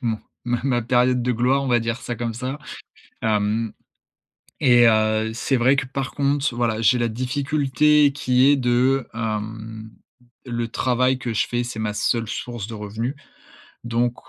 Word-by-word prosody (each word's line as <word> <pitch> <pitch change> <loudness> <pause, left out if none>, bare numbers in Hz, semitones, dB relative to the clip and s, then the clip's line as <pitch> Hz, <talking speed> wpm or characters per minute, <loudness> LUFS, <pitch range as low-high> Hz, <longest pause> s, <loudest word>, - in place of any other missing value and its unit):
mon 110 -2 -1 0.3
ma 120 -1 -1
ma 120 -3 +1
période 125 +1 +2
de 125 +1 +1
gloire, 125 +4 +2
on 135 - -3
va 120 -1 +4
dire 115 0 -2
ça 120 -2 -5
comme 115 0 -3
ça. 130 +4 -4 0.6
Hem. 110 +1 0 0.9
Et, 120 -2 +6
heu, 110 0 +2
c'est 130 +3 0
vrai 130 +3 +3
que, 125 - -1
par 135 +1 -4
contre, 140 -1 0
voilà, 115 -2 0
j'ai 125 +3 +4
la 120 -1 +1
difficulté 140 +3 +2
qui 130 -1 +3
est 145 - +5
de, 125 +1 +2
hem, 110 0 -5 0.6
le 120 -1 -3
travail 125 +2 +1
que 120 -3 -4
je - - +1
fais, 120 0 -1
c'est 120 -2 -6
ma 105 -1 -1
seule 115 +1 0
source 120 -4 -5
de 115 - -7
revenus. 110 +5 -4 0.7
Donc, 120 +1 0
120 Hz, 170 wpm, -22 LUFS, 115-130 Hz, 0.9 s, Et